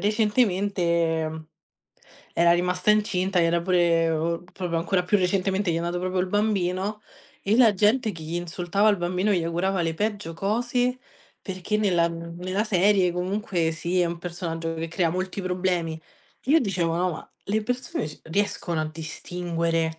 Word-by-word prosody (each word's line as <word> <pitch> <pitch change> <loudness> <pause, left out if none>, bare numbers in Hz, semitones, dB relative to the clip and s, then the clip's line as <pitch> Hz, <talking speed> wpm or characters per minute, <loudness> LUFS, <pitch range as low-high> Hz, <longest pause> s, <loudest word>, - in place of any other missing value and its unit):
recentemente 190 -6 +1
mhmm, 155 0 -8 0.9
era 170 0 +5
rimasta 180 +3 +2
incinta, 195 -4 +2
era 170 0 +2
pure 170 -2 +2
proprio 175 -3 -2
ancora 180 +2 +1
più 205 +3 +3
recentemente, 190 0 +1
gli - - 0
è - - 0
nato 175 +1 -2
proprio 185 0 -1
il 185 - 0
bambino, 205 0 0 0.4
e 200 - +2
la 225 -5 +6
gente 215 +4 +3
che 165 -2 -9
je 165 +2 -3
insultava 175 +4 0
il 205 - +2
bambino 180 +4 0
je 175 -3 +1
augurava 175 +2 0
le 165 - 0
peggio 205 -3 -2
cose, 245 +6 0 0.4
perché 190 +2 -2
nella 175 -5 +3
mhmm, 170 0 -7
nella 185 +3 0
serie 190 -3 +3
comunque 180 -2 -1
sì, 175 +3 -1
è 175 - +3
un 170 0 -3
personaggio 170 -2 -4
che 165 +1 -4
crea 165 0 +1
molti 185 +2 -3
problemi. 180 -3 -1 0.5
Io 310 +4 +6
dicevo: 175 -7 0
"No, 180 +1 +1
ma 155 - -9 0.2
le 215 +2 0
persone 245 - -2
c 150 - -12
riescono 175 -2 -1
a 155 - -1
distinguere" 165 +1 -2
180 Hz, 160 wpm, -25 LUFS, 170-200 Hz, 0.9 s, la